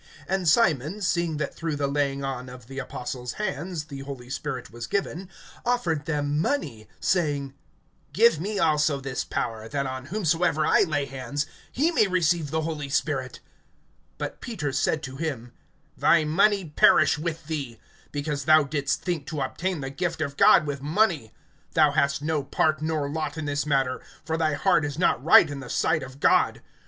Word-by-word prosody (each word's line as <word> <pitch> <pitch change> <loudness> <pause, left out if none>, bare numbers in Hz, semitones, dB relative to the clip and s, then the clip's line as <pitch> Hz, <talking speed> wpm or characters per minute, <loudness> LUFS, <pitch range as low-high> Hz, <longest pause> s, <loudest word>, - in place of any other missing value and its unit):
(18)And 190 -2 -1
Simon, 160 - +3
seeing 170 -3 0
that 150 -1 -3
through 165 -2 -3
the 145 0 -1
laying 140 -1 -1
on 130 -2 -4
of 125 -1 -11
the 135 +3 -7
apostles' 125 -1 -5
hands 175 -4 -3
the 145 -3 -9
Holy 135 -2 -8
Spirit 135 -2 -4
was 120 0 -7
given, 190 +1 -2 0.3
offered 170 -12 0
them 145 -1 0
money, 155 - -2 0.2
(19)saying: 145 -6 0 0.6
Give 465 +1 +4
me 210 +1 -3
also 150 -4 +2
this 135 -2 -3
power, 110 0 -4
that 140 -1 -1
on 130 0 -5
whomsoever 165 -4 +1
I - - +4
lay 145 -3 +1
hands, 135 +2 -3 0.3
he 310 +7 +1
may 215 -11 +3
receive 170 -4 +1
the 160 +2 -1
Holy 155 -3 -4
Spirit. 135 -3 -2 0.8
(20)But - - -5
Peter 175 - -3
said 145 +3 0
to 130 -1 -7
him: 135 -7 -4 0.4
Thy 160 -2 +4
money 195 +5 +3
perish 155 0 +4
with 165 0 -4
thee; 140 -7 -4 0.3
because 145 -1 -3
thou 155 -1 +6
didst 140 -1 -2
think 170 -6 -2
to 155 -3 -3
obtain 165 +5 -2
the 135 0 -4
gift 170 +3 -2
of 140 -3 -2
God 150 - +6
with 140 -2 -4
money: 155 - +1 0.4
(21)Thou 145 -1 +5
hast 140 -2 +1
no 155 -1 0
part 155 +2 +1
nor 155 -2 -1
lot 155 +1 -3
in 160 - -3
this 145 0 -1
matter[8:21]; 135 -4 0 0.2
for 160 0 -1
thy 155 -2 +1
heart 150 +1 +3
is 145 0 -3
not 165 -7 +2
right 165 +1 +7
in 145 -1 -6
the 135 -2 -9
sight 160 -1 +1
of 135 +1 -9
God. - - +3
150 Hz, 180 wpm, -26 LUFS, 135-165 Hz, 0.8 s, right